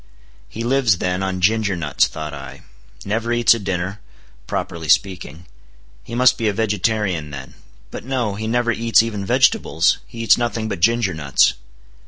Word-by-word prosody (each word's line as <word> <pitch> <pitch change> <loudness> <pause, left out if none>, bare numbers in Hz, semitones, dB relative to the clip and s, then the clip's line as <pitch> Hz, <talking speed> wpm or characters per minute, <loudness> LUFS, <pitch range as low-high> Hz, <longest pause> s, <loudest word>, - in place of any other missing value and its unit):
He 115 - -6
lives, 120 -5 +2
then, 90 +1 -2
on 95 -1 -3
ginger 105 0 +2
nuts, 75 -5 +1
thought 80 -1 -7
I; 70 -1 -10 0.4
never 115 +3 -2
eats 120 -1 +5
a 115 - -3
dinner, 95 0 -4 0.5
properly 80 -2 -4
speaking; 85 -3 0 0.6
he 115 - -8
must 125 0 +4
be 115 - 0
a 105 - +1
vegetarian 105 -6 -1
then; 70 -2 -9 0.4
but - - -7
no; 125 -5 -2
he 110 +2 -5
never 120 +1 +1
eats 115 -1 +3
even 105 -3 -4
vegetables, 85 -3 +2
he 115 -1 -7
eats 115 - +4
nothing 115 -2 -2
but 100 -4 -4
ginger 115 +1 +2
nuts. 70 -4 +2
105 Hz, 165 wpm, -20 LUFS, 85-115 Hz, 0.6 s, eats